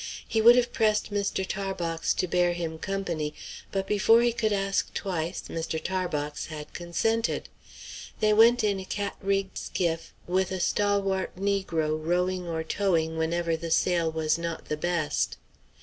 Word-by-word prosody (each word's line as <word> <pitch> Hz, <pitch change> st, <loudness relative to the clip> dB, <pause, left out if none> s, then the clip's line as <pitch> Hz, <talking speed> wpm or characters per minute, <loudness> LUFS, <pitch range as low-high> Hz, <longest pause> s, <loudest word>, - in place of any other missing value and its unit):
He 220 Hz, -, +1 dB
would 235 Hz, +2 st, +9 dB
have 240 Hz, -1 st, +2 dB
pressed 215 Hz, -3 st, +1 dB
Mr. 200 Hz, -2 st, 0 dB
Tarbox 180 Hz, -4 st, -2 dB
to 185 Hz, -, 0 dB
bear 175 Hz, 0 st, +2 dB
him 165 Hz, -2 st, -4 dB
company; 170 Hz, -6 st, -3 dB, 0.4 s
but 195 Hz, -1 st, -1 dB
before 210 Hz, +4 st, +4 dB
he 240 Hz, -1 st, +2 dB
could 220 Hz, -2 st, 0 dB
ask 195 Hz, -1 st, 0 dB
twice, 175 Hz, -4 st, -2 dB
Mr. 160 Hz, -1 st, -3 dB
Tarbox 155 Hz, -5 st, -2 dB
had 150 Hz, -2 st, -8 dB
consented. 225 Hz, +7 st, -1 dB, 0.7 s
They 215 Hz, 0 st, +4 dB
went 230 Hz, +3 st, +6 dB
in 200 Hz, -2 st, +1 dB
a 190 Hz, -, -7 dB
cat 200 Hz, +1 st, -3 dB
rigged 195 Hz, 0 st, -1 dB
skiff, 165 Hz, -2 st, -2 dB
with 185 Hz, +1 st, 0 dB
a 190 Hz, -, -2 dB
stalwart 200 Hz, 0 st, +1 dB
negro 170 Hz, -6 st, -1 dB
rowing 180 Hz, +2 st, 0 dB
or 160 Hz, -1 st, -2 dB
towing 160 Hz, -2 st, 0 dB
whenever 165 Hz, +1 st, 0 dB
the 165 Hz, +1 st, -5 dB
sail 170 Hz, 0 st, +2 dB
was 160 Hz, 0 st, 0 dB
not 170 Hz, -1 st, -5 dB
the 150 Hz, -, -1 dB
best. 160 Hz, -2 st, -1 dB
180 Hz, 155 wpm, -27 LUFS, 165-200 Hz, 0.7 s, would